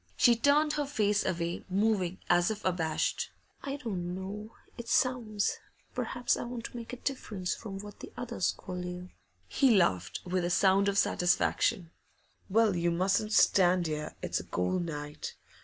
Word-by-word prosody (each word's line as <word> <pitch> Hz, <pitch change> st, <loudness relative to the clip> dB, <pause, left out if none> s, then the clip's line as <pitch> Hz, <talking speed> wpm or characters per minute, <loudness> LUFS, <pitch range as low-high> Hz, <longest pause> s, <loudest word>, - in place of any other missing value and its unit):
She 240 Hz, -2 st, +6 dB
turned 290 Hz, +5 st, +3 dB
her 295 Hz, -2 st, -1 dB
face 210 Hz, -6 st, +1 dB
away, 170 Hz, -1 st, -2 dB
moving 190 Hz, -2 st, +1 dB
as 175 Hz, 0 st, +4 dB
if 215 Hz, -1 st, -5 dB
abashed. 170 Hz, -4 st, 0 dB, 0.3 s
'I 275 Hz, 0 st, -3 dB
don't 185 Hz, -10 st, -4 dB
know. 200 Hz, +3 st, -6 dB, 0.3 s
It 235 Hz, -1 st, -8 dB
sounds 230 Hz, -6 st, +1 dB, 0.3 s
perhaps 245 Hz, -2 st, 0 dB
I -, -, -4 dB
want 240 Hz, -1 st, -6 dB
to -, -, -8 dB
make 235 Hz, -1 st, -7 dB
a -, -, -4 dB
difference 215 Hz, -9 st, -3 dB
from 195 Hz, -4 st, -7 dB
what 205 Hz, +1 st, -9 dB
the -, -, -9 dB
others 235 Hz, -6 st, -1 dB
call 180 Hz, -1 st, -6 dB
you.' 180 Hz, 0 st, -6 dB, 0.4 s
He 265 Hz, -5 st, +4 dB
laughed 90 Hz, -, +1 dB
with 180 Hz, 0 st, 0 dB
a 175 Hz, -, 0 dB
sound 195 Hz, +2 st, +4 dB
of 200 Hz, -, -1 dB
satisfaction. 180 Hz, 0 st, +2 dB, 0.6 s
'Well, 215 Hz, -1 st, +3 dB
you 170 Hz, 0 st, +1 dB
mustn't 190 Hz, +5 st, +1 dB
stand 180 Hz, -4 st, +5 dB
here; 150 Hz, -1 st, -3 dB
it's -, -, -1 dB
a -, -, -7 dB
cold 130 Hz, -, -1 dB
night. 150 Hz, -2 st, -6 dB
195 Hz, 165 wpm, -30 LUFS, 175-230 Hz, 0.6 s, She